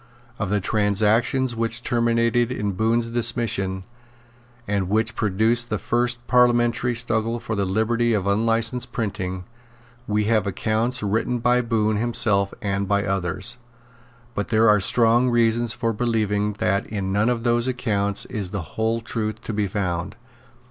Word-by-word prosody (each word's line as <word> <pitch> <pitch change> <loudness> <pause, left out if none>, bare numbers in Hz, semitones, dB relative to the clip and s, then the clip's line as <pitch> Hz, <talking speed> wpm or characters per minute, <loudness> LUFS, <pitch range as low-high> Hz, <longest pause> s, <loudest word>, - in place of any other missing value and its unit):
Of 100 - -2
the 105 +1 +1
transactions 110 +5 +1
which 115 +1 -1
terminated 115 0 +1
in 105 -5 -2
Bohun's 115 +4 0
dismission, 115 -5 -1 0.8
and 100 -2 -1
which 110 +3 0
produced 110 +4 +1
the 105 - -1
first 120 +2 -1
parliamentary 120 -1 +2
struggle 115 0 0
for 110 - -4
the 100 -1 0
liberty 115 +4 +1
of 100 -3 -1
unlicensed 115 +4 0
printing, 95 -4 -3 0.6
we 105 0 +1
have 110 -1 +1
accounts 110 +5 -1
written 115 +4 0
by 125 +1 +2
Bohun 110 -3 0
himself 105 -3 +1
and 100 -1 -1
by 100 +1 +1
others; 95 +5 -2 0.8
but 105 - -3
there 110 0 +3
are 105 -1 +5
strong 120 +4 +3
reasons 120 -1 +2
for 115 -1 -1
believing 105 -2 0
that 100 0 -1
in 100 -3 -3
none 105 +4 +2
of 120 -2 -1
those 120 0 +2
accounts 100 -5 0
is 100 -4 -4
the 95 -4 -6
whole 115 +1 0
truth 110 -2 -4
to 115 - -5
be 105 -1 0
found. 95 -1 -3
110 Hz, 150 wpm, -23 LUFS, 100-120 Hz, 0.8 s, are